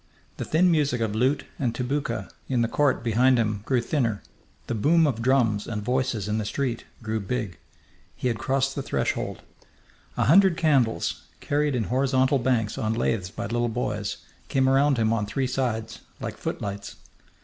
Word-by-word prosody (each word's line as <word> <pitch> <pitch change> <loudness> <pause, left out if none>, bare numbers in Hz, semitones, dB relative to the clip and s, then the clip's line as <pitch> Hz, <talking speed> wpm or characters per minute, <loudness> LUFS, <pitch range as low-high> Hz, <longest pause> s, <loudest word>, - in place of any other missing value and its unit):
The - - -4
thin 175 +3 +3
music 145 -6 +1
of 110 -2 -1
lute 130 +6 +1
and 120 -4 0
tabouka 125 -2 -2 0.2
in 125 -3 +2
the - - +1
court 140 -1 +1
behind 125 +3 +4
him 105 -3 0
grew 130 -3 +2
thinner; 115 -5 -1 0.4
the - - -3
boom 155 +9 +4
of 125 -6 0
drums 115 -5 +2
and 105 -2 -3
voices 125 -4 -1
in 105 +1 0
the - - -1
street 120 +2 -2 0.2
grew 110 0 -1
big. 105 -2 -3 0.6
He - - -2
had 115 -3 -1
crossed 135 +2 0
the 140 - -3
threshold. - - -2 0.7
A - - +2
hundred 185 +3 +6
candles, 130 - +1 0.2
carried 145 -1 0
in 120 - 0
horizontal 130 +3 +2
banks 120 -4 0
on 110 +1 0
laths 110 -5 0
by - - -6
little 120 +3 0
boys, 105 -3 -2 0.3
came 130 -1 +2
around 135 +1 +4
him 110 -1 +2
on 105 -2 -1
three 135 +5 -1
sides, 115 -3 -2 0.2
like - - -5
footlights. 100 0 -5
125 Hz, 170 wpm, -25 LUFS, 110-135 Hz, 0.7 s, hundred